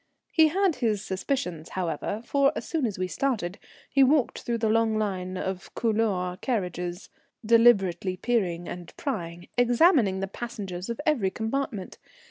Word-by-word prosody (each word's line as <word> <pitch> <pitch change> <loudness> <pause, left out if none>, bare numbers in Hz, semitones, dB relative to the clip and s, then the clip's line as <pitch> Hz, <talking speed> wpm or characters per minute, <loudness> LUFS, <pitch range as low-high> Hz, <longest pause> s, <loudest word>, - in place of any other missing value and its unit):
He 320 -1 +6
had 375 +1 +1
his 215 -4 0
suspicions, 185 - -3
however, 185 +4 -3
for 280 +1 +3
as - - -4
soon 310 -7 0
as 205 - -5
we 185 0 -1
started 205 -5 -2 0.3
he 275 - +2
walked 270 -1 +2
through 235 -1 -1
the 225 -1 0
long 220 0 +2
line 185 -3 -2
of 190 0 -4
couloir 210 -6 0
carriages, 180 -6 -3 0.3
deliberately 200 -6 +4
peering 180 -7 0
and 175 -1 -8
prying, 175 - -4
examining 245 - +4
the 195 - -1
passengers 195 -4 -6
of 235 - -3
every 250 -11 +2
compartment. 220 -1 -3
215 Hz, 145 wpm, -27 LUFS, 185-245 Hz, 0.3 s, He